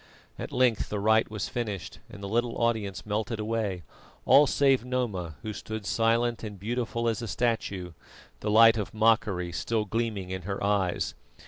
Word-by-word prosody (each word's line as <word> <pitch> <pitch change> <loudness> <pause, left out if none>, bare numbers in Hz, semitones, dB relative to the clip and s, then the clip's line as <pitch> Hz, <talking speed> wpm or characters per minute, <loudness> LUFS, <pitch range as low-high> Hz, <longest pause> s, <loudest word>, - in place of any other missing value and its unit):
At - - -5
length 125 -4 +2
the 105 - -2
rite 110 +2 +3
was 105 -2 -3
finished, 105 -7 -4
and 100 - -11
the - - -3
little 120 +3 0
audience 110 -5 -1
melted 105 +1 -2
away, 105 -5 -2 0.4
all 145 +1 +7
save 135 -3 +3
Noma, 110 - -2
who 110 - -4
stood 110 0 -6
silent 115 +2 +1
and 105 -3 -7
beautiful 115 +2 -2
as 115 +1 0
a 115 - -4
statue, 105 -7 -1 0.5
the 105 - -3
light 115 +1 +7
of 105 - -5
mockery 110 -5 +2
still 110 +5 -1
gleaming 105 -3 -2
in 95 0 -3
her 100 +2 -4
eyes. 100 -3 0
110 Hz, 165 wpm, -28 LUFS, 100-115 Hz, 0.5 s, all